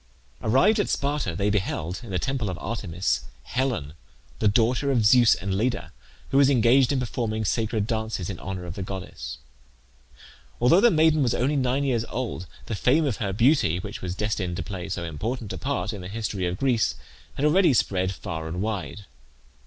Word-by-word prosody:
Arrived 160 Hz, -, +4 dB
at 205 Hz, -, 0 dB
Sparta 140 Hz, -, -1 dB
they 100 Hz, +4 st, +1 dB
beheld, 90 Hz, -3 st, -2 dB
in 115 Hz, -, -10 dB
the 95 Hz, -, -1 dB
temple 125 Hz, +2 st, -1 dB
of 90 Hz, -, -4 dB
Artemis, 90 Hz, -, -2 dB, 0.2 s
Helen, 120 Hz, -, -2 dB, 0.5 s
the 110 Hz, -, +3 dB
daughter 120 Hz, +6 st, +2 dB
of 120 Hz, -5 st, +2 dB
Zeus 120 Hz, +1 st, +6 dB
and 95 Hz, 0 st, -3 dB
Leda, 115 Hz, +5 st, -1 dB, 0.4 s
who 135 Hz, -, +3 dB
was 140 Hz, -1 st, +6 dB
engaged 125 Hz, 0 st, +4 dB
in 140 Hz, -, +1 dB
performing 110 Hz, -3 st, -2 dB
sacred 110 Hz, 0 st, 0 dB
dances 110 Hz, -5 st, -2 dB
in 95 Hz, -4 st, -5 dB
honour 95 Hz, -2 st, -5 dB
of 85 Hz, -, -6 dB
the 95 Hz, -, -6 dB
goddess. 90 Hz, -9 st, -6 dB, 1.2 s
Although 125 Hz, +11 st, +5 dB
the 240 Hz, -, +7 dB
maiden 155 Hz, -4 st, +4 dB
was 125 Hz, -4 st, +2 dB
only 135 Hz, +5 st, +1 dB
nine 130 Hz, +1 st, +1 dB
years 125 Hz, -5 st, +1 dB
old 115 Hz, -8 st, -4 dB, 0.2 s
the -, -, -4 dB
fame 140 Hz, +9 st, +3 dB
of 130 Hz, -7 st, -1 dB
her 100 Hz, -5 st, -2 dB
beauty, 115 Hz, -, +3 dB
which 100 Hz, +2 st, -6 dB
was 90 Hz, -1 st, -4 dB
destined 100 Hz, -4 st, -2 dB
to -, -, -3 dB
play 95 Hz, -2 st, -6 dB
so 90 Hz, -2 st, -3 dB
important 105 Hz, -, -4 dB
a -, -, -5 dB
part 115 Hz, -7 st, -2 dB
in 100 Hz, -, -7 dB
the 90 Hz, -, -7 dB
history 100 Hz, -3 st, -3 dB
of 90 Hz, +1 st, -3 dB
Greece, 125 Hz, -3 st, +1 dB, 0.4 s
had 145 Hz, -, 0 dB
already 170 Hz, +2 st, +5 dB
spread 95 Hz, -6 st, +1 dB
far 80 Hz, -3 st, -5 dB
and 85 Hz, +3 st, -4 dB
wide. 100 Hz, -3 st, -4 dB
110 Hz, 190 wpm, -25 LUFS, 95-130 Hz, 1.2 s, the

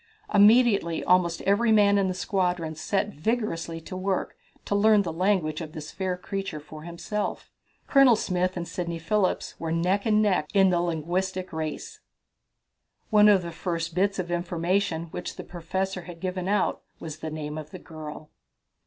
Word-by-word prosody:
Immediately 205 Hz, -5 st, +5 dB
almost 175 Hz, -2 st, +2 dB
every 220 Hz, +4 st, +3 dB
man 205 Hz, -2 st, +5 dB
in 195 Hz, -, +2 dB
the 185 Hz, -, -2 dB
squadron 180 Hz, -4 st, -1 dB
set 195 Hz, +6 st, -1 dB
vigorously 170 Hz, -3 st, -2 dB
at 165 Hz, -, -12 dB
work 185 Hz, +1 st, -2 dB, 0.3 s
to -, -, -2 dB
learn 210 Hz, 0 st, +5 dB
the 165 Hz, -3 st, -4 dB
language 175 Hz, -3 st, +1 dB
of 155 Hz, -2 st, -7 dB
this 155 Hz, 0 st, -7 dB
fair 185 Hz, -2 st, -2 dB
creature 195 Hz, -3 st, -4 dB
for 155 Hz, +1 st, -11 dB
himself. 170 Hz, +5 st, -4 dB, 0.3 s
Colonel 275 Hz, -4 st, +6 dB
Smith 185 Hz, -2 st, -1 dB
and 170 Hz, -1 st, -4 dB
Sidney 170 Hz, 0 st, -4 dB
Phillips 185 Hz, +4 st, -1 dB
were 165 Hz, -1 st, -3 dB
neck 180 Hz, +6 st, +1 dB
and 215 Hz, -1 st, +4 dB
neck 190 Hz, -8 st, +2 dB
in 195 Hz, -1 st, +5 dB
the 175 Hz, -1 st, +2 dB
linguistic 180 Hz, +3 st, -2 dB
race. 160 Hz, -, -5 dB, 1.1 s
One 210 Hz, -1 st, +7 dB
of 195 Hz, -3 st, +4 dB
the 170 Hz, -, -5 dB
first 170 Hz, -1 st, -3 dB
bits 195 Hz, +3 st, +1 dB
of 175 Hz, -2 st, -3 dB
information 175 Hz, 0 st, 0 dB
which -, -, -5 dB
the -, -, -7 dB
Professor 190 Hz, +2 st, -3 dB
had 175 Hz, -1 st, -10 dB
given 185 Hz, 0 st, -3 dB
out 205 Hz, +1 st, +1 dB, 0.2 s
was 155 Hz, -2 st, -7 dB
the 160 Hz, -, -4 dB
name 150 Hz, -1 st, -5 dB
of 155 Hz, -1 st, -9 dB
the -, -, -8 dB
girl. 155 Hz, -1 st, -9 dB
180 Hz, 170 wpm, -26 LUFS, 165-200 Hz, 1.1 s, One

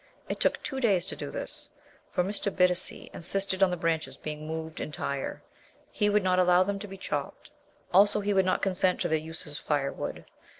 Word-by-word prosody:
It -, -, -3 dB
took -, -, +1 dB
two 270 Hz, -3 st, -3 dB
days 200 Hz, -8 st, +3 dB
to -, -, -3 dB
do -, -, -5 dB
this, -, -, -5 dB, 0.4 s
for 180 Hz, -, +1 dB
Mr. 200 Hz, +1 st, -1 dB
Bittacy 180 Hz, -1 st, +2 dB
insisted 190 Hz, +2 st, -2 dB
on 195 Hz, -, +6 dB
the 180 Hz, -, -2 dB
branches 165 Hz, -1 st, -1 dB
being 155 Hz, 0 st, -6 dB
moved 160 Hz, +1 st, -5 dB
entire. 140 Hz, -2 st, -4 dB, 0.5 s
He 210 Hz, -, +2 dB
would 205 Hz, -1 st, +3 dB
not 185 Hz, 0 st, +3 dB
allow 180 Hz, 0 st, +5 dB
them 200 Hz, +1 st, -2 dB
to 205 Hz, -, -6 dB
be 195 Hz, 0 st, -9 dB
chopped; 185 Hz, -, -4 dB, 0.4 s
also, 205 Hz, +3 st, +6 dB
he 205 Hz, 0 st, 0 dB
would 190 Hz, -1 st, +4 dB
not 185 Hz, -, +1 dB
consent 185 Hz, -1 st, +2 dB
to -, -, +1 dB
their 160 Hz, 0 st, +2 dB
use 160 Hz, +3 st, -4 dB
as 145 Hz, -1 st, -6 dB
firewood. 140 Hz, -2 st, -2 dB
180 Hz, 200 wpm, -29 LUFS, 160-195 Hz, 0.5 s, on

